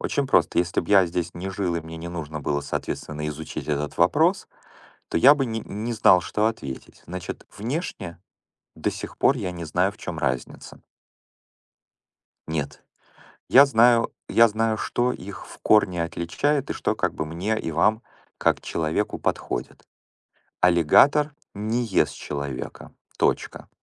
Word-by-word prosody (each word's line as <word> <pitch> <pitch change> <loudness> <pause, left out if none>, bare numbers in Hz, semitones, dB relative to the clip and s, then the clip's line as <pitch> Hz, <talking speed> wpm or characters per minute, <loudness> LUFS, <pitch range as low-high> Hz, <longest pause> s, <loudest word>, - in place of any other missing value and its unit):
очень 140 -2 -1
просто. - - +3
Если 85 0 +1
б - - -10
я 100 -2 +6
здесь 85 0 -3
не 90 +2 -5
жил 90 -2 -2
и 85 - -1
мне 80 +1 -9
не 80 - -7
нужно 80 -3 -5
было, 70 0 -1
соответственно, 75 +1 -4
изучить 75 +1 -6
этот 75 -1 -2
вопрос, - - +3 0.6
то - - -2
я 135 +12 +8
бы 135 -3 -1
не 110 -1 -3
не 110 +4 -5
знал, 105 -5 +5
что 105 +4 0
ответить. 70 -13 -5
Значит, 90 +1 -7
внешне 110 - -4 0.5
до - - -1
сих - - -8
пор 135 - +4
я 100 -6 -3
не 85 -1 -6
знаю, 90 +5 +1
в 105 - -21
чем 85 -3 -6
разница. 65 -4 -4 1.6
Нет. 75 -2 -4 0.7
Я 140 +2 +8
знаю 120 -2 +4 0.2
я 115 0 +6
знаю, 110 +1 0
что 120 +3 0
их 95 -4 -8
в - - -13
корне 90 -5 +3
отличает 135 - -1
и - - -1
что - - -1
как - - -1
бы 75 - -3
мне 90 +8 -2
и 80 - -4
вам, 105 +8 +2 0.4
как - - +2
человеку, 80 +7 -2
подходит. - - -3 0.8
Аллигатор 90 - +5 0.2
не 110 +4 -1
ест 95 - +1
человека. 70 -3 -6 0.3
Точка. - - -1
90 Hz, 155 wpm, -24 LUFS, 80-110 Hz, 1.6 s, я